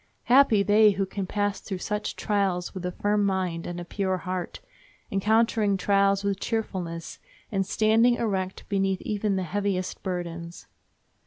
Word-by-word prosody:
Happy 245 -5 +5
they 210 0 +5
who 195 0 -1
can 190 0 -5
pass 205 0 -1
through 195 - -5
such 210 +3 -3
trials 195 -4 -1
with 185 - -6
a - - -3
firm 205 +3 0
mind 185 -4 -1
and 175 0 -5
a 175 - -6
pure 190 0 -1
heart, 180 +1 -4 0.5
encountering 215 0 +2
trials 200 +1 +2
with 200 -1 -1
cheerfulness, 180 -8 -4 0.3
and 195 -2 0
standing 225 +4 +4
erect 190 -5 -2
beneath 195 -2 0
even 210 -1 -1
the 190 - -1
heaviest 190 0 -2
burdens. 170 -2 -5
195 Hz, 150 wpm, -26 LUFS, 185-210 Hz, 0.5 s, Happy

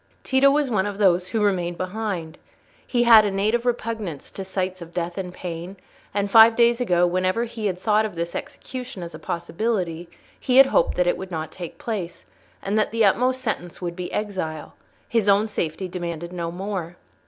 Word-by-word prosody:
Tito 265 +1 +4
was 285 -2 +1
one 205 -2 +1
of 205 -1 -5
those 180 -3 +3
who 220 0 -1
remained 175 -4 0
behind. 185 -4 -4 0.5
He 240 -1 +2
had 230 -2 +8
a 205 - +1
native 215 +5 0
repugnance 220 - -3
to 195 - -6
sights 185 -1 -3
of 170 0 -11
death 175 0 -2
and 185 -2 -4
pain, 180 +1 -7 0.3
and 200 0 -1
five 225 +1 +8
days 235 +1 +3
ago 180 -7 +3
whenever 185 +5 +1
he 225 -2 -3
had 185 -2 -2
thought 210 +3 +2
of 215 -4 -4
this 170 0 -3
execution 250 -8 -7
as 170 - -8
a - - -9
possibility 175 -1 -2 0.3
he 255 0 +1
had 270 - +10
hoped 220 - +2
that 180 - +3
it 175 - +1
would 190 - -7
not 160 -3 -4
take 175 -3 -8
place, 200 -7 -5 0.4
and 205 +2 0
that 215 - +1
the 225 -1 +2
utmost 255 +6 +2
sentence 175 -6 -3
would 175 -1 -4
be 180 0 -5
exile: 185 -7 -4 0.3
his 225 -3 +1
own 200 +2 +4
safety 185 -3 -3
demanded 170 -1 -5
no 170 -2 -3
more. 180 -2 -5
190 Hz, 195 wpm, -23 LUFS, 175-220 Hz, 0.5 s, had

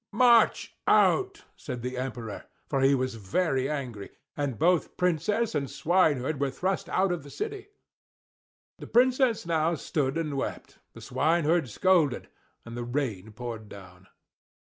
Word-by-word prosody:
"March 235 +1 +4
out!" 390 +1 +3
said 125 -5 -7
the 125 +1 -3
Emperor, 125 -4 -5 0.2
for 135 - 0
he 135 +1 +5
was 130 -1 -1
very 130 - -1
angry; 125 -9 -5 0.3
and 140 -5 -2
both 175 +2 +1
Princess 190 +6 0
and 140 -3 -2
swineherd 155 -5 +1
were 140 -1 +1
thrust 185 +9 -2
out 190 0 +1
of 175 -2 -2
the 145 - -12
city. 415 - -5 1.1
The - - -8
Princess 250 -2 +3
now 165 0 +1
stood 140 -1 -2
and 155 -3 -2
wept, 135 - -5
the - - -12
swineherd 165 -3 +1
scolded, 160 - +2 0.4
and 115 0 -8
the 120 - -4
rain 120 -6 -3
poured 115 -2 -7
down. 95 -1 -13
145 Hz, 145 wpm, -27 LUFS, 125-180 Hz, 1.1 s, he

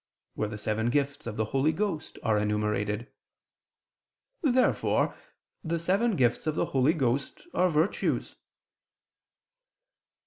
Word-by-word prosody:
where 105 - -1
the 105 - -6
seven 110 +2 -1
gifts 140 +1 -1
of 110 - -5
the 110 - +1
Holy 135 +3 +3
Ghost 180 -2 -3
are 110 -1 +2
enumerated. 105 +1 0 1.4
Therefore 260 -4 +2 0.5
the 170 0 -1
seven 195 +7 +1
gifts 125 +1 +1
of 155 - 0
the - - +1
Holy 135 +3 +2
Ghost 135 -2 -1
are 180 0 +3
virtues. 160 +3 0
135 Hz, 115 wpm, -28 LUFS, 110-165 Hz, 1.4 s, Holy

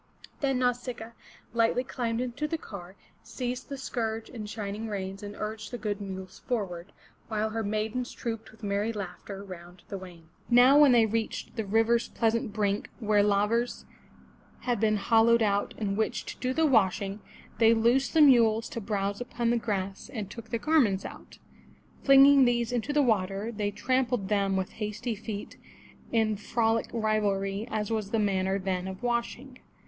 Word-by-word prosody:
Then 270 -2 +1
Nau 250 0 +3
sic'a 240 -2 -7
a - - -27 0.4
lightly 235 +2 +2
climbed 240 -2 -2
into 255 +4 -3
the 325 - -2
car, 190 - -10 0.3
seized 245 +3 -5
the 280 - -5
scourge 225 -4 -3
and 215 -4 -7
shining 210 +1 -4
reins 195 -1 -4
and 205 0 -7
urged 215 0 -5
the 245 - -5
good 210 -2 -3
mules 190 -1 -7
forward, 195 -7 -3 0.4
while 220 -1 -1
her 225 +1 -2
maidens 215 +4 -2
trooped 225 -1 -5
with 220 0 -20
merry 205 +2 0
laughter 200 -1 -7
round 175 -2 -11
the 195 - -5
wain. 175 -3 -13 0.2
Now 250 +4 +7
when 290 -3 +7
they 235 -2 +6
reached 220 0 -3
the 220 -3 -2
river's 225 +3 +2
pleasant 230 -1 0
brink 205 -1 -1
where 210 -3 +3
lavers 210 +4 +1 0.8
had 245 -3 -1
been 215 0 +2
hollowed 225 +2 +4
out 200 -1 0
in 200 -3 -1
which 220 +1 -1
to - - -7
do 255 - -1
the 320 +4 +2
washing, 200 -5 +2 0.4
they 225 -1 +6
loosed 240 +7 +2
the 320 - +6
mules 230 -5 +5
to 230 - -5
browse 200 0 -2
upon 240 -1 -1
the 240 - +2
grass, 195 -4 -3
and 210 -4 -5
took 230 -1 -9
the 230 - -1
garments 230 -9 +2
out. - - -10 0.7
Flinging 275 0 +7
these 240 -1 +1
into 245 +3 -1
the 295 0 +3
water, 200 -2 0
they 210 -2 -2
trampled 245 -1 0
them 200 -2 +1
with 190 -1 -2
hasty 215 +2 -4
feet 210 -1 -7 0.5
in 220 -2 +2
frolic 225 +2 0
rivalry 210 -2 0
as 215 0 -2
was 215 -3 -1
the 225 - 0
manner 195 -2 +1
then 185 -1 -2
of 190 +4 -7
washing. 245 +2 -2
220 Hz, 175 wpm, -28 LUFS, 200-240 Hz, 0.8 s, Now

